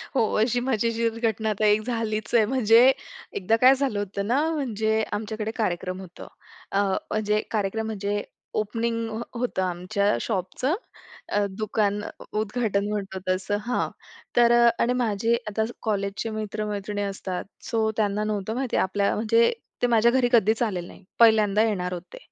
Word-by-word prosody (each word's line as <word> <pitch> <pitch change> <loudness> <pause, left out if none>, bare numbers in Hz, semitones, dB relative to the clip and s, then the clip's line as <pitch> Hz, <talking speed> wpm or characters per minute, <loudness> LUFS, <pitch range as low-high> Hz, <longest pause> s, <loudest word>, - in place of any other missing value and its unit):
हो, 260 - +4 0.2
अशी 245 +2 +2
मजेशीर 230 -2 0
घटना 220 0 -2
आता 215 0 0
एक 210 +1 +4
झालीच 220 -2 -2
आहे. 220 -2 +6
म्हणजे 245 +1 +5 0.4
एकदा 200 +4 +2
काय 260 +1 +8
झालं 265 -7 -1
होतं 200 0 -3
ना, 260 +6 +2
म्हणजे 220 -6 0
आमच्याकडे 215 +1 -3
कार्यक्रम 185 -3 -2
होतं. 180 -2 -11 0.4
अ, 195 - +1 0.3
म्हणजे 210 0 +1
कार्यक्रम 220 +1 -1
म्हणजे 205 -1 -2 0.3
ओपनिंग 230 +2 -1
हो 220 +1 -4 0.2
होतं 245 -6 -1
आमच्या 185 +3 0
शॉपचं. 220 - -1 0.6
अ, 205 0 +1
दुकान 210 0 -1
अ, - - -5 0.3
उद्घाटन 215 -2 0
म्हणतो 195 -2 -3
तसं 190 +2 0
हां. 245 +1 0 0.5
तर 235 -1 +5
अ, 240 0 +6
आणि 245 +1 +2
माझे 225 +1 +1
आता 220 +1 0
ज 230 - -6
कॉलेजचे 200 0 -2
मित्र-मैत्रिणी 210 -1 -3
असतात. 195 -2 -4 0.2
सो 225 -2 +1
त्यांना 210 0 +1
नव्हतं 215 +1 -2
माहिती 260 -1 -1
आपल्या 200 +1 +1
म्हणजे 230 +2 +3 0.3
ते 245 - +3
माझ्या 235 0 +4
घरी 255 -1 +3
कधीच 225 0 +3
आलेले 185 -6 -2
नाही, - - -14 0.2
पहिल्यांदा 215 -2 +5
येणार 180 -5 -1
होते. 175 0 -8
215 Hz, 155 wpm, -25 LUFS, 200-230 Hz, 0.6 s, काय